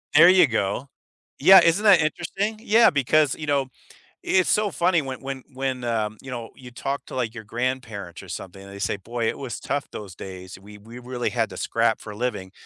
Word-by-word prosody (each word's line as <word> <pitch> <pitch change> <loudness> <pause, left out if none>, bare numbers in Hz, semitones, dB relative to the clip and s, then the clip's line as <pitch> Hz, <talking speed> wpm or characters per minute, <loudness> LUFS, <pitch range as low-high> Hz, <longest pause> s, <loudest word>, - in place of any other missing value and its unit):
There 165 +4 +9
you 180 -3 +6
go. 110 +2 -2 0.5
Yeah, 190 -1 +9
isn't 170 +5 +3
that 195 -6 +7
interesting? 195 +7 -2
Yeah, 230 +1 +5
because, 145 +1 +2
you 155 - -7
know, 140 -2 +1 0.6
it's 185 -1 +2
so 210 -1 +2
funny 170 +1 +2
when, 130 -1 -6
when 135 -1 -6
when, 130 -1 -3
um, 110 -2 -1
you 130 - -9
know, 120 -2 -6
you 125 -1 -12
talk 135 +3 -4
to, - - -9
like, 120 -3 -2
your 115 - -7
grandparents 115 -5 -4
or - - -13
something, 95 +1 -8
and 100 - -12
they 100 - -9
say, 100 - -1
"Boy, 115 +3 -4
it - - -2
was 130 -3 -5
tough 145 0 -3
those 100 -4 -8
days. 95 0 -9
We 105 +1 -13
we 115 +4 -12
really 125 0 -3
had 115 -4 -1
to 95 - -9
scrap 115 +3 0
for 105 - -9
a - - -10
living." 105 -6 -3
125 Hz, 220 wpm, -24 LUFS, 110-150 Hz, 0.6 s, There